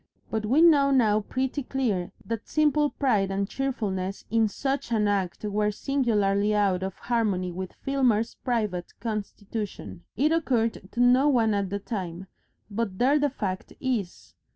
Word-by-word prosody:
But 220 -1 -1
we 285 +8 +4
know 290 -5 +6
now 225 -6 +4
pretty 260 +6 -2
clearly 240 -10 -1 0.2
that 230 -1 -4
simple 300 -1 +2
pride 215 -11 +1
and 195 0 -1
cheerfulness 200 -8 -3
in 225 -1 +3
such 270 +3 -3
an 215 -2 +2
act 195 -3 -1
were 210 0 +1
singularly 210 -4 +1
out 195 -3 +2
of 190 0 -4
harmony 205 -7 0
with 185 +1 -6
Filmer's 245 -5 +1
private 210 -8 -2
constitution. 210 - -5 0.2
It 295 +6 +3
occurred 235 -11 0
to 235 - -5
no 250 +4 +5
one 230 -5 +3
at 200 -2 -1
the 200 - -2
time, 190 -4 -5 0.5
but 200 -3 -2
there 275 +6 +3
the 290 0 +2
fact 190 -8 -4
is. 235 -9 -3
220 Hz, 155 wpm, -26 LUFS, 195-260 Hz, 0.5 s, know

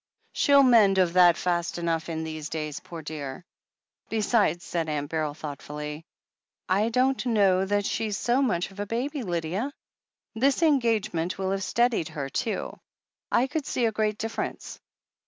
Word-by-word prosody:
"Shell 280 -1 +5
mend 220 -7 +5
of 180 -2 +3
that 175 -2 +6
fast 175 -1 -1
enough 165 -1 -1
in 160 -1 -3
these 155 -2 -5
days, 150 -2 -4
poor 165 -2 -9
dear! 150 0 -6 0.6
Besides," 210 -6 +1
said 165 -2 -2
Aunt 145 -1 -3
Beryl 155 -2 -1
thoughtfully, 150 +1 -7 0.6
"I 200 +4 +2
don't 255 +2 +1
know 195 -5 +3
that 205 0 +1
she's 215 -2 -1
so 245 +4 +1
much 195 -9 0
of 195 - -14
a 205 - -3
baby, 265 +7 -2
Lydia. 180 - -2 0.6
This 270 +7 +2
en 295 -4 +4
gagement 210 -7 -1
will 190 0 -1
have 195 0 -1
steadied 235 -6 +1
her, 140 -2 -5
too. 220 - -3 0.5
I 245 - +4
could 295 +1 -3
see 245 - 0
a 225 - +2
great 215 -1 0
difference. 225 +1 -5
190 Hz, 160 wpm, -26 LUFS, 160-230 Hz, 0.6 s, that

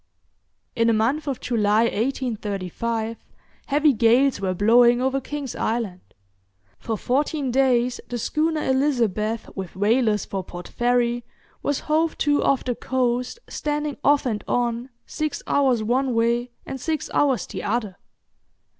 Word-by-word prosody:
In 230 0 +2
the 230 - +4
month 260 +8 +1
of 270 -3 -2
July, 215 -2 +2
1835, 225 -2 -2 0.5
heavy 295 +1 +3
gales 245 +3 +3
were 185 -1 -1
blowing 235 +5 +5
over 265 +1 0
King's 285 -1 -5
Island. 220 -6 -2 0.8
For 225 -2 -3
fourteen 280 +3 0
days 250 -2 +2
the 245 - -3
schooner 310 +6 0
'Elizabeth', 230 -6 0
with 190 -2 -6
whalers 215 +1 +2
for 195 -1 -4
Port 175 0 -9
Fairy, 240 0 +1 0.4
was 285 -1 -1
hove 315 +1 0
to 290 -1 +2
off 275 - +2
the 250 - -1
coast, 250 - -1
standing 295 -1 -2
off 290 -1 +4
and 220 -4 -2
on, 240 +1 -1 0.2
six 310 -1 -3
hours 260 -5 +2
one 250 +2 +1
way 235 +2 +1 0.2
and 265 - -6
six 315 -2 -2
hours 275 -4 +2
the - - -6
other. 210 -4 -2
245 Hz, 135 wpm, -23 LUFS, 225-275 Hz, 0.8 s, blowing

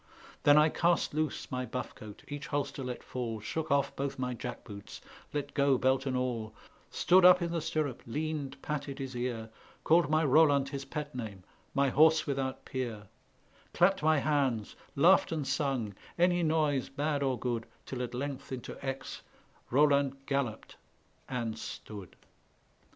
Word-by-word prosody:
Then 145 0 +6
I 155 +1 +6
cast 170 0 +1
loose 155 -1 -2
my 125 -1 -1
buff 125 +1 -5
coat, 105 -1 -11
each 145 -1 -6
holster 145 -2 -2
let 125 -1 -5
fall, 115 -3 -4
Shook 155 +9 -4
off 140 -1 +2
both 140 0 -3
my 125 -1 -2
jack 120 - -6
boots, 100 -3 -9 0.3
let 145 -1 -3
go 140 -2 +3
belt 130 +2 +2
and 130 -1 0
all, 115 -4 -2 0.3
Stood 185 +1 +4
up 180 0 +9
in 170 -1 -2
the 170 -1 -1
stirrup, 155 -5 -2
leaned, 145 +1 -3
patted 145 -2 -3
his 135 -2 -5
ear, 120 -2 -3 0.3
Called 165 -2 +4
my 155 +1 +3
Roland 145 -1 +4
his 140 -1 -5
pet 150 +2 -5
name, 105 -7 -6 0.3
my 140 0 +3
horse 155 +4 +5
without 135 -2 -2
peer 115 -6 -4 0.7
Clapped 185 +1 +4
my 155 0 +4
hands, 135 -7 0 0.2
laughed 170 +7 +5
and 155 -3 -1
sung, 135 -8 -1 0.2
any 175 0 +3
noise, 155 -4 +1
bad 145 +1 -1
or 135 -2 +1
good, 120 -3 -2 0.2
Till 130 -2 -5
at 125 0 -4
length 135 +1 -4
into 125 -2 -6
Aix 135 0 -4 0.5
Roland 140 0 +3
galloped 135 -6 -2 0.5
and 115 -3 -3
stood. 100 -5 -8
140 Hz, 160 wpm, -31 LUFS, 125-150 Hz, 0.7 s, up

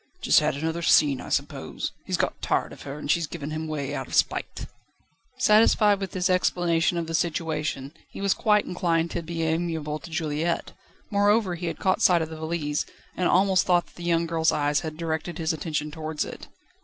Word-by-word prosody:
"Just - - +5
had - - 0
another 160 +3 -2
scene, 145 -5 +4
I - - -8
suppose. - - -2 0.2
He's - - 0
got - - -1
tired - - 0
of - - -13
her, 140 +1 -7
and 150 -1 -1
she's 170 -1 +1
given 150 -2 -6
him 155 +1 -3
away 150 -3 -3
out - - -4
of - - -4
spite." - - 0 0.7
Satisfied 210 -1 +5
with 195 -1 -3
this 185 0 +1
explanation 175 -2 +2
of 170 - -1
the 165 - -6
situation, 155 -4 -2 0.2
he - - -10
was 200 -1 +2
quite 210 -2 +2
inclined 170 -2 0
to 170 - -2
be 165 0 -4
amiable 160 -2 -1
to 145 - -11
Juliette. 160 +1 -2 0.4
Moreover, 205 -1 +3
he 175 0 -4
had 165 - -3
caught 190 -2 +1
sight 175 -3 +5
of 160 - -6
the 160 - -7
valise, 155 -2 -2 0.3
and 180 - +1
almost 190 0 +3
thought 175 -1 +3
that - - -24
the 175 - -9
young 170 -1 +2
girl's 165 -1 +1
eyes 145 0 +1
had 155 -1 -6
directed 165 0 -3
his 160 0 0
attention 150 -1 -3
towards 155 0 -3
it. - - -9
165 Hz, 205 wpm, -26 LUFS, 155-175 Hz, 0.7 s, Just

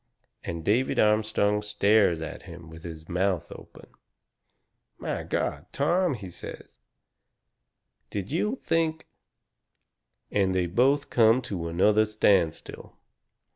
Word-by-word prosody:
And 85 -1 -5
David 120 +6 +1
Armstrong 105 -1 +2
stares 105 -4 +2
at 80 - -7
him 85 -1 -11
with 80 0 -11
his 80 -1 -9
mouth 90 -1 -1
open. - - -12 1.1
"My - - -3
God! 75 +4 -3
Tom," 170 +2 +1
he 95 -5 -9
says, 85 - -9 1.3
"did 100 +1 -5
you 210 - 0
think 165 -8 -1 0.7
?" - - -52
And 95 -2 +1
they 90 -1 +1
both 130 +11 +1
come 115 +1 +5
to 90 -6 -4
another 105 +6 +3
standstill. 100 -6 0
105 Hz, 115 wpm, -27 LUFS, 85-115 Hz, 1.3 s, come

